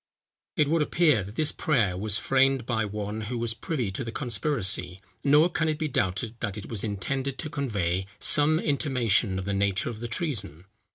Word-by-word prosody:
It 150 - +3
would 165 +2 +2
appear 150 - +3
that 100 +3 -10
this 155 +1 +1
prayer 115 - +1
was 105 +2 +2
framed 135 -1 +2
by 110 -3 0
one 105 +1 -4
who 115 +3 -4
was 115 -1 0
privy 125 -3 -3
to 95 - -4
the 115 - -5
conspiracy; 115 - 0 0.2
nor 150 +3 +5
can 165 -2 -1
it 155 - -1
be 155 - -1
doubted 115 -4 -1
that 105 -2 -3
it 105 - -8
was 110 -4 -2
intended 130 +6 -2
to 155 - -3
convey 95 -9 -1
some 150 +6 +4
intimation 125 - +1
of 95 - -4
the 100 - -2
nature 100 +3 0
of 110 - -9
the 120 - -4
treason. 110 - -3
115 Hz, 190 wpm, -27 LUFS, 100-145 Hz, 0.2 s, nor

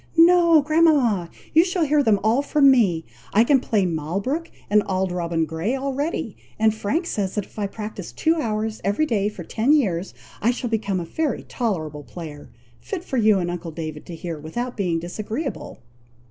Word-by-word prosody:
"No, 335 -2 +6
grandmama! 285 - +3 0.2
you 325 - +7
shall 360 -2 0
hear 295 0 +3
them 220 -6 +3
all 225 +5 +3
from 285 -1 +5
me. 190 -11 +2 0.3
I 220 - +6
can 270 +3 +4
play 215 -6 +1
Malbrook, 190 - -2 0.2
and 210 0 +4
Auld 190 -1 0
Robin 170 -2 -1
Grey, 165 +10 -2
already; 275 +4 -2 0.2
and 220 0 +3
Frank 220 - -1
says 200 - -2
if 210 +1 -4
I 205 - 0
practise 210 -3 -7
two 320 - +2
hours 220 -5 -2
every 205 +11 +1
day 210 -7 0
for 195 -4 -9
ten 225 - 0
years, 195 - +1 0.3
I 225 - +3
shall 245 -1 -2
become 205 -4 0
a 170 - -4
very 305 - -2
tolerable 160 - -3
player, 150 -1 -9 0.3
fit 385 -5 -5
for 265 - -3
you 215 -3 +4
and 175 -2 -1
uncle 175 -1 -5
David 155 -1 -7
to 170 - -7
hear, 165 -1 -6
without 240 +12 -4
being 180 -6 0
disagreeable." 215 - -5
215 Hz, 180 wpm, -23 LUFS, 175-275 Hz, 0.3 s, you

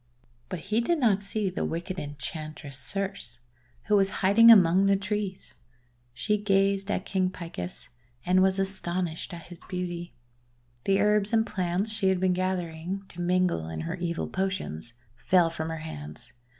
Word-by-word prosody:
But 180 -4 -4
he 210 +6 0
did 340 +8 +1
not 215 -8 +3
see 200 -1 -1
the - - -3
wicked 175 +3 -3
Enchantress 150 0 -6
Circe, 195 - -3 0.5
who 210 - +2
was 195 -1 +4 0.2
hiding 230 +4 +7
among 190 -3 +7
the 195 - +4
trees. 200 -1 -4 0.6
She 210 - -1
gazed 195 -1 +2
at 185 - -1
King 185 -1 0
Picus 140 - -7 0.4
and 185 +1 +4
was 190 0 +4
astonished 185 -3 0
at 170 -2 -9
his 175 -2 -11
beauty. 175 -2 -4 0.7
The 195 0 +3
herbs 210 +1 +2
and 225 0 +4
plants 185 +1 -1
she 215 -3 +1
had 190 -1 +1
been 185 0 +2
gathering, 180 0 -3
to 175 - -8
mingle 175 - +1
in 80 -1 -4
her 80 - -3
evil 170 -1 -3
potions, 190 - -3 0.2
fell 175 +3 +3
from 160 -1 -4
her 160 - -4
hands. 75 - -9
185 Hz, 160 wpm, -27 LUFS, 165-195 Hz, 0.7 s, hiding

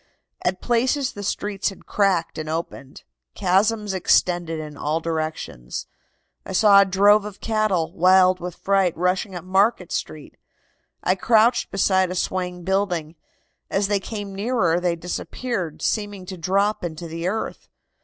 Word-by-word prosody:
"At 185 +1 -1
places 250 +3 +1
the 205 - -8
streets 205 0 -2
had 195 - -13
cracked 185 -6 0
and 155 0 -5
opened. 155 -4 -5 0.3
Chasms 210 +2 +1
extended 175 -2 +1
in 150 -1 -7
all 150 +3 -1
directions. 155 - -4 0.6
I - - -7
saw 200 0 +7
a - - +4
drove 200 +2 +4
of 205 -1 -8
cattle, 210 -7 0
wild 185 +1 +4
with 175 0 -6
fright, 195 -3 +1
rushing 180 +3 0
up 175 - -6
Market 190 0 +2
Street. 150 -2 -5 0.7
I 185 - +3
crouched 225 +4 +3
beside 190 -1 +2
a 180 - -4
swaying 180 -1 -2
building. 180 -4 -1 0.6
As 195 0 0
they 205 -1 +2
came 205 0 -6
nearer 200 -4 +1
they 175 -1 0
disappeared, 180 +1 -4
seeming 205 -3 -2
to 185 - -7
drop 195 +5 0
into 170 0 -5
the 165 +2 -4
earth. 220 +4 -4
185 Hz, 145 wpm, -23 LUFS, 170-205 Hz, 0.7 s, saw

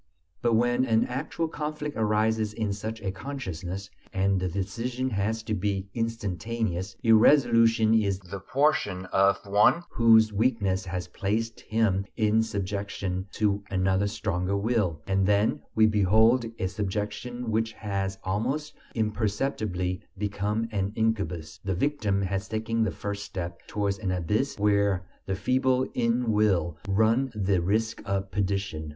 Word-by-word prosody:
But 120 -1 +3
when 120 +2 +2
an 115 -3 +3
actual 150 +6 -3
conflict 150 -1 -4
arises 110 0 +1
in 105 -2 -1
such 110 +2 -5
a 95 - -1
consciousness, 95 - -6 0.2
and 95 0 +1
the 95 - 0
decision 120 +8 -3
has 110 +2 -1
to 110 - -3
be 100 -1 -2
instantaneous, 110 -3 -2
irresolution 115 -1 +5
is 100 -4 +2
the 95 +1 -8
portion 105 -7 +1
of 95 0 +4
one 105 - +4
whose 110 -1 +5
weakness 100 -4 +1
has 90 -1 -4
placed 115 +3 -2
him 100 -3 0
in 110 0 +3
subjection 100 -2 -3
to 100 -2 0
another 95 +1 +1
stronger 100 -2 -1
will, 100 -8 0
and 95 0 +1
then 105 +1 +2
we 110 - +6
behold 110 +4 +4
a - - -1
subjection 105 +5 -3
which 110 +1 0
has 100 -2 -3
almost 125 +11 -2 0.2
imperceptibly 105 -4 -1 0.2
become 105 +2 -1
an 100 -1 -1
incubus: 95 -7 -1
the 95 -2 -1
victim 105 -4 0
has 95 +1 -2
taken 110 +1 -1
the 110 - +2
first 100 0 -5
step 90 -4 -5
towards 100 -1 -1
an 100 -3 -2
abyss 90 +9 0
where 100 -2 +2 0.2
the 95 - 0
feeble 130 +4 +2
in 115 0 +1
will 95 -7 +2
run 110 +6 +2
the 95 -3 +1
risk 110 +5 0
of 100 -1 -2
perdition. 100 -6 -2
105 Hz, 140 wpm, -27 LUFS, 95-115 Hz, 0.2 s, we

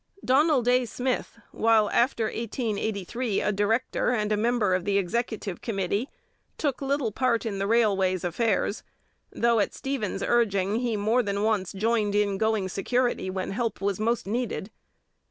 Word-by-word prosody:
Donald 270 -1 +3
A. 250 0 +4
Smith, 245 +1 -3
while 225 -2 +3
after 235 -1 +2
1883 220 -1 -2
a 210 - +1
director 210 +5 0
and 215 -4 0
a - - +3
member 220 -2 +1
of 185 -1 0
the 200 +1 +1
executive 205 0 -2
committee, 205 +3 -2 0.5
took 285 -4 -1
little 275 -4 0
part 235 +1 0
in 200 -3 -3
the 195 - -1
railway's 195 -5 +2
affairs, 200 +3 0 0.5
though 235 -1 +2
at 205 - 0
Stephen's 270 -7 -3
urging 205 -4 +2
he 240 -3 -1
more 220 +5 +2
than 200 -2 -2
once 210 -4 0
joined 210 0 0
in 200 -2 +1
going 220 -3 +1
security 240 +2 0
when 185 0 -3
help 230 +3 -2
was 200 -1 -1
most 230 +2 0
needed. 225 -1 -3
220 Hz, 155 wpm, -26 LUFS, 200-240 Hz, 0.5 s, A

